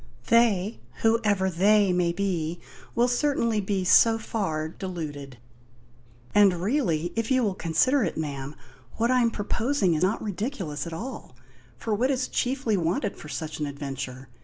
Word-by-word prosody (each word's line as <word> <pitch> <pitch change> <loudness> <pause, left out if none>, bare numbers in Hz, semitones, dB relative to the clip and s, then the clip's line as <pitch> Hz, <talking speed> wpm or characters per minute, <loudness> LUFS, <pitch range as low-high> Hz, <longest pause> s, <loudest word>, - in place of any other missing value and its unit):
"They 220 -3 +3 0.2
whoever 215 -4 +2
they 195 +2 +3
may 175 -1 +2
be 175 -3 -2 0.4
will 240 +1 +3
certainly 245 -4 +1
be 195 -1 -1
so 225 +5 +5
far 190 -9 -2
deluded." 155 -7 -6 1.0
"And 200 -4 +5
really 175 - 0
if 230 -1 -1
you 260 -2 +3
will 205 -3 +1
consider 210 - +2
it, - - -2
ma'am 145 -2 -4 0.4
what 235 +2 +2
I 255 -1 +4
am 235 - +3
proposing 220 -1 0
is 155 - -1
not 190 +5 +1
ridiculous 200 - -4
at 170 - -6
all. 220 - -7 0.4
For 220 - -2
what 245 +6 +1
is 260 -1 0
chiefly 250 -4 0
wanted 175 +3 -1
for 150 - -11
such 155 0 -5
an 150 - -1
adventure? 135 -2 -6
195 Hz, 155 wpm, -26 LUFS, 160-230 Hz, 1.0 s, so